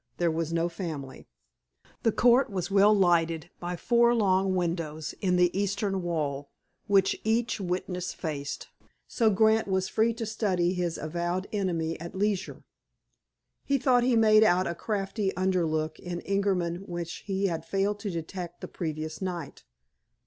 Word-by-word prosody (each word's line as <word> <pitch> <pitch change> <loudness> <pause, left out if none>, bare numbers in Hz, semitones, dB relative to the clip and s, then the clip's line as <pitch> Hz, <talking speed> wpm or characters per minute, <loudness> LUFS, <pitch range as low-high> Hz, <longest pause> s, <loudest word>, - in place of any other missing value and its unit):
There 170 -1 +2
was 165 0 -2
no 165 0 +1
family. 160 -7 -6 0.7
The 225 - +3
court 245 +4 +4
was 190 -1 -3
well 200 +1 +6
lighted 170 -4 +2
by 175 0 -4
four 235 +5 +3
long 190 -3 +2
windows 165 -3 -2
in 180 -2 +2
the 180 0 +3
eastern 200 0 -1
wall, 145 -5 -2 0.4
which 195 -1 +3
each 225 +2 0
witness 180 0 -3
faced, 145 -4 -5 0.4
so 230 -3 +2
Grant 220 +2 +3
was 190 -1 0
free 225 +1 +2
to 230 -1 -4
study 190 -5 0
his 175 -2 -2
avowed 175 +4 -2
enemy 170 -5 -1
at 170 +3 -8
leisure. 200 -1 -1 1.0
He 280 - +1
thought 250 -2 +3
he 245 0 +2
made 215 -1 +6
out 185 -2 +3
a 170 - -1
crafty 195 +1 -2
underlook 165 -4 0
in 175 -1 -5
Ingerman 190 -4 0
which 175 -1 -4
he 195 0 0
had 165 -4 -1
failed 195 +4 -1
to 205 - -4
detect 175 0 -6
the - - -5
previous 155 -1 -5
night. 175 -6 -5
185 Hz, 150 wpm, -28 LUFS, 170-205 Hz, 1.0 s, well